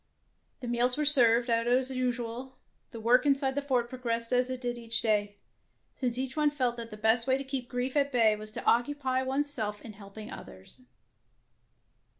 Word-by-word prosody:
The 245 - -6
meals 240 +2 +1
were 300 - 0
served 240 -5 +5
out 230 0 0
as 255 +2 +3
usual, 250 0 -4 0.3
the 230 - -9
work 240 +3 +3
inside 275 -2 +1
the 285 - -2
fort 255 -4 0
progressed 235 -1 -1
as 250 +1 +2
it 255 -1 -4
did 245 -1 -4
each 230 -1 -1
day, 205 -2 0 0.6
since 245 -2 0
each 260 +1 -3
one 300 -1 +2
felt 255 -5 -1
that 230 -1 -7
the 210 - -10
best 220 +3 +2
way 260 0 +3
to 275 - -5
keep 265 -2 -5
grief 250 +2 -3
at 285 -1 +1
bay 225 -4 +3
was 215 0 -3
to - - -6
occupy 260 +1 +1
one's 275 +2 -1
self 210 -5 -3
in 220 - -9
helping 210 +1 -11
others. 95 - -9
245 Hz, 190 wpm, -29 LUFS, 230-265 Hz, 0.6 s, served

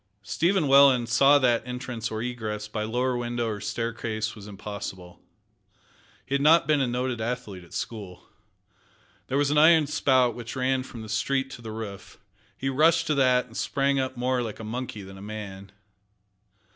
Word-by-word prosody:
Stephen 170 - +1
Welland 135 -3 +6
saw 140 +4 +6
that 125 -4 +3
entrance 125 -2 -5
or 110 +1 -4
egress 110 -4 -4
by 105 0 -4
lower 125 +4 0
window 120 -1 -2
or 105 -2 -4
staircase 110 0 -3
was 105 -2 -11
impossible. 100 -3 -8 1.0
He 135 - -5
had 150 +4 +5
been 150 -2 +2
a 130 - +1
noted 125 -1 -2
athlete 110 -6 -4
at 85 - -18
school. 100 -6 -6 1.0
There 135 - -1
was 145 0 +2
an 150 - +4
iron 160 0 +6
spout 130 -4 +2
which 120 +1 -7
ran 130 0 +1
from 120 -3 -9
the - - -9
street 135 +6 -1
to 125 - -9
the 110 -1 -7
roof. 110 -3 -8 0.4
He 135 - -3
rushed 160 +5 +3
to 150 - +1
that, 130 -3 +3
and 115 -2 -17
sprang 140 +2 0
up 130 -1 -3
more 125 +1 0
like 115 -3 -5
a - - -7
monkey 110 -2 -5
than 95 0 -11
a - - -11
man. 100 -2 -8
120 Hz, 175 wpm, -26 LUFS, 110-135 Hz, 1.0 s, Welland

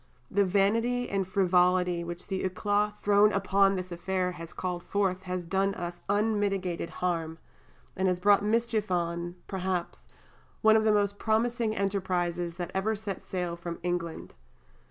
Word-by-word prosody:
The 200 +1 +3
vanity 230 +6 +2
and 195 -2 0
frivolity 180 -2 +2
which 175 +1 -6
the 190 -1 -3
éclat 205 +3 0
thrown 205 0 +4
upon 195 0 +3
this 185 -1 -5
affair 180 +1 -1
has 170 -2 -8
called 180 -1 -3
forth 190 -1 0
has 180 -2 -4
done 195 +3 0
us 175 0 -5
unmitigated 200 -5 0 0.2
harm, 165 -2 -1 0.6
and 190 0 +1
has 180 -1 +1
brought 200 +2 +4
mischief 220 -1 0
on 170 -1 -1
(perhaps) 185 -2 -3 0.6
one 220 0 +7
of 220 0 +3
the 215 - +5
most 205 -1 +1
promising 225 0 +1
enterprises 180 -4 -1
that 175 0 -5
ever 210 +3 0
set 200 -2 -5
sail 180 -2 -3
from 170 0 -6
England. 175 -2 -3
190 Hz, 150 wpm, -29 LUFS, 175-205 Hz, 0.6 s, one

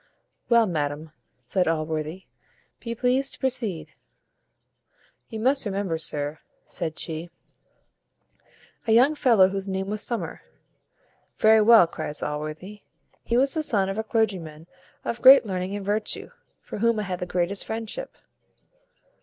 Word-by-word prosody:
"Well, 235 -1 +5
madam," 155 -3 -3 0.3
said 180 +8 0
Allworthy, 155 +2 -2 0.5
"be 230 -1 -5
pleased 255 +3 0
to - - -6
proceed." 240 - -2 1.4
"You 220 - -6
must 270 +4 +2
remember, 195 -6 -2
sir," 150 -1 -3 0.3
said 160 -1 -4
she, 165 +1 -4 1.6
"a 220 - +4
young 255 +6 +5
fellow, 230 -10 +4
whose 195 0 -4
name 190 +1 -3
was 210 0 -3
Summer." 235 -1 -4 1.0
"Very 220 0 +5
well," 225 -3 +7
cries 155 -2 -5
Allworthy, 155 +7 -5 0.4
"he 235 - 0
was 270 +2 +3
the 315 - -1
son 200 -10 0
of 195 +3 -3
a - - -1
clergyman 185 -9 -2 0.4
of 235 - -3
great 265 -1 +9
learning 185 0 -3
and 200 -1 -6
virtue, 210 +1 -2 0.3
for - - -7
whom 230 0 +2
I - - -1
had 185 -2 -4
the 180 - -5
highest 180 +2 +1
friendship." 225 - -5
200 Hz, 135 wpm, -25 LUFS, 165-230 Hz, 1.6 s, great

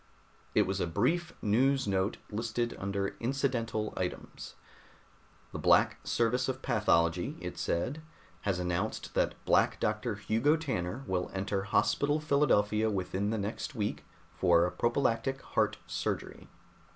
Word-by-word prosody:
It - - +6
was 95 +1 -2
a - - 0
brief 170 - +1
news 130 +5 +3
note, 95 +2 0
listed 115 +2 -2
under 100 0 -1
"incidental 115 -4 -1
items." 90 -1 -5 1.0
"The - - -5
Black - - +4
Service 120 +3 +1
of 130 - -4
Pathology," 85 +1 +2
it - - -6
said, 130 - -1 0.4
"has 100 -3 0
announced 90 +4 -2
that - - +1
Black - - +3
Doctor 110 +1 -1
Hugo 110 +8 +2
Tanner 130 - -3
will 90 -4 -1
enter 95 0 -1
Hospital 145 +8 +2
Philadelphia 110 -8 +2
within 100 0 -1
the 110 - 0
next 110 +8 -4
week 105 -2 -2 0.3
for 85 -1 +3
prophylactic 120 +5 0
heart - - +2
surgery. - - -4
110 Hz, 125 wpm, -31 LUFS, 95-130 Hz, 1.0 s, It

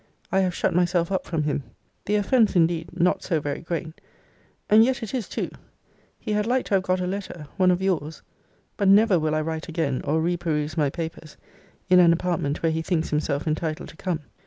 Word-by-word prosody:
I 190 - +3
have 185 -2 0
shut 185 - 0
myself 175 0 +1
up 190 - -1
from 165 -3 -1
him. 150 -1 -1 0.4
The 205 - +1
offence 215 +1 +3
indeed 165 -1 +2
not 180 +2 +2
so 165 -4 0
very 145 -1 -4
great 165 -1 -5 0.7
and 215 +1 +7
yet 255 0 0
it 225 - -6
is 245 -7 -3
too. - - -3 0.7
He 215 - -5
had 210 +1 0
like 255 +1 +1
to - - -4
have 195 - +4
got 185 0 0
a - - -1
letter. 185 -4 -5
One 185 -1 +4
of 180 +1 +1
your's. 160 -5 -2 0.5
But 200 - +1
never 200 -2 +5
will 155 0 0
I 155 - +1
write 160 +1 -4
again, 155 -6 -1
or 155 +2 +1
re 175 +2 0
peruse 155 -3 -2
my 150 -3 +2
papers, 160 0 -7 0.5
in 180 -1 +6
an 170 -1 +6
apartment 165 -4 -2
where 165 - +3
he 160 0 -1
thinks 165 -1 -1
himself 150 -1 -1
entitled 155 0 -2
to - - -13
come. 170 -2 -3
170 Hz, 210 wpm, -24 LUFS, 160-190 Hz, 0.7 s, and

